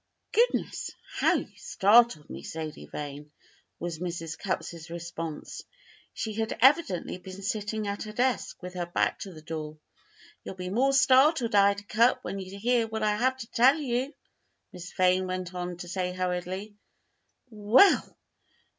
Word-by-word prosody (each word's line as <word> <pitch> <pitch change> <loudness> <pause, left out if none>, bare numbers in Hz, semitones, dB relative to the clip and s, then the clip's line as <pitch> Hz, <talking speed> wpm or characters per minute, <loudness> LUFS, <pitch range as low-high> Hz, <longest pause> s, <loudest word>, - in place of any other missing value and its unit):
"Goodness! 480 +2 +1 0.3
how - - +3
you - - -4
startled 210 -5 +4
me, - - -8
Sadie 160 -1 -7
Vane," 145 0 -7 0.5
was 170 -2 -5
Mrs. 170 -2 -4
Cupp's 165 0 -4
response. 165 -2 -6 0.5
She 220 - -4
had 220 +1 -2
evidently 260 - +3
been 190 +2 -10
sitting 210 +1 -2
at 200 0 -3
her 215 - -7
desk 245 -3 -1
with 180 0 -6
her 175 -1 -3
back 175 - 0
to 195 - -7
the 155 -3 -12
door. 155 -1 -6 0.7
"You'll - - -7
be 180 0 -5
more 265 +6 +2
startled, 265 -1 +4
Ida 200 0 +4
Cupp, 230 +5 +2
when 195 - -4
you 190 +1 -8
hear 235 +2 +2
what 220 0 -4
I 210 -1 +2
have 260 +4 +1
to 225 -3 -9
tell 260 +6 +5
you," 260 -2 -1 0.6
Miss 180 0 -9
Vane 185 0 +2
went 185 0 -4
on 180 -1 -4
to 175 - -8
say 180 0 -2
hurriedly. 185 +3 -3 0.8
"Well! 215 - +4
195 Hz, 155 wpm, -28 LUFS, 175-230 Hz, 0.8 s, tell